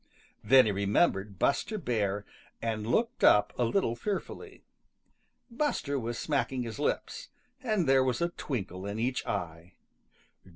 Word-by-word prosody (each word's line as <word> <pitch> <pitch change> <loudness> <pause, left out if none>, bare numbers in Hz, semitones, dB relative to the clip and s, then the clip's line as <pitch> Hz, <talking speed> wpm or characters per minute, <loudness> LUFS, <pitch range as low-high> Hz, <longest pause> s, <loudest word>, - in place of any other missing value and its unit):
Then 135 -2 +7
he 105 - +1
remembered 100 - +1
Buster 215 - 0
Bear 105 - -1 0.3
and 110 -2 -3
looked 230 - 0
up 105 0 +5
a 125 - 0
little 115 -2 +1
fearfully. 200 - -5 0.9
Buster 230 - -1
was 120 0 -4
smacking 135 -4 -1
his 115 +3 -7
lips, - - -2 0.3
and 215 - 0
there 135 0 +5
was 125 -2 0
a 170 - +1
twinkle 100 - -5
in 100 +1 -4
each 125 +3 -1
eye. 80 +2 -4
120 Hz, 135 wpm, -29 LUFS, 105-150 Hz, 0.9 s, Then